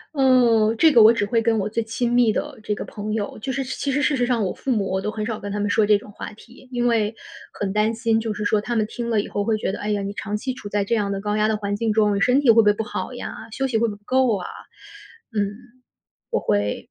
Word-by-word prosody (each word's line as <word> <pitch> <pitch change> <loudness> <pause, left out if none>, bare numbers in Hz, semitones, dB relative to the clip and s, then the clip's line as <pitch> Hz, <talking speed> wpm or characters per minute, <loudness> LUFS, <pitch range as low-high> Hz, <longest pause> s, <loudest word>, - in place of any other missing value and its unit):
嗯， 240 -5 +4
这 320 +5 +6
个 235 - +6
我 220 +2 +8
只 205 -3 0
会 230 +2 +1
跟 225 0 +2
我 205 0 -1
最 230 +2 -1
亲 235 +2 -2
密 240 -3 +4
的 - - -4
这 210 0 -1
个 - - -5
朋 210 0 -5
友 215 -1 -3
就 265 +4 -4
是 270 - -1
其 260 +1 -3
实 290 - +1
事 290 -2 +2
实 245 - +2
上 240 -3 +1
我 185 - -1
父 - - -7
母， 210 -6 +1
我 190 - 0
都 210 - -2
很 215 0 -4
少 220 -1 -3
跟 205 - -6
他 - - -2
们 205 - 0
说 215 +1 +3
这 210 -1 +5
种 205 - -12
话 215 - -8
题。 240 +4 -17
因 245 -1 -1
为 225 -2 +1 0.4
很 200 -2 -3
担 210 +2 +1
心， 225 -1 +1
就 225 -1 -3
是 210 0 -5
说 210 +1 +2
他 240 +3 -3
们 215 -2 +2
听 235 0 -5
了 220 -3 +2
以 - - -8
后 205 0 -2
会 220 0 +1
觉 210 - -2
得： 200 - -6
“哎 210 - -4
呀， 205 - 0
你 200 0 -4
长 210 0 -4
期 260 +5 -3
处 210 - -9
在 205 0 0
这 215 +4 0
样 200 -2 -1
的 195 - -4
高 210 +1 -1
压 215 0 +2
的 220 - +1
环 205 -1 -3
境 225 -1 0
中， 210 -1 +3
你 200 - 0
身 250 +7 +3
体 260 - +2
会 225 - +7
不 230 - +6
会 210 - +5
不 220 - -3
好 215 - -5
呀？ 245 - -6 0.2
休 270 +2 -1
息 235 - 0
会 230 +1 +2
不 210 - -4
会 - - -11
不 - - -35
够 255 -2 +2
啊？” 180 - -6 0.9
嗯， 205 -1 -1 0.8
我 - - +1
会 105 0 -1
220 Hz, 325 characters per minute, -22 LUFS, 205-235 Hz, 0.9 s, 我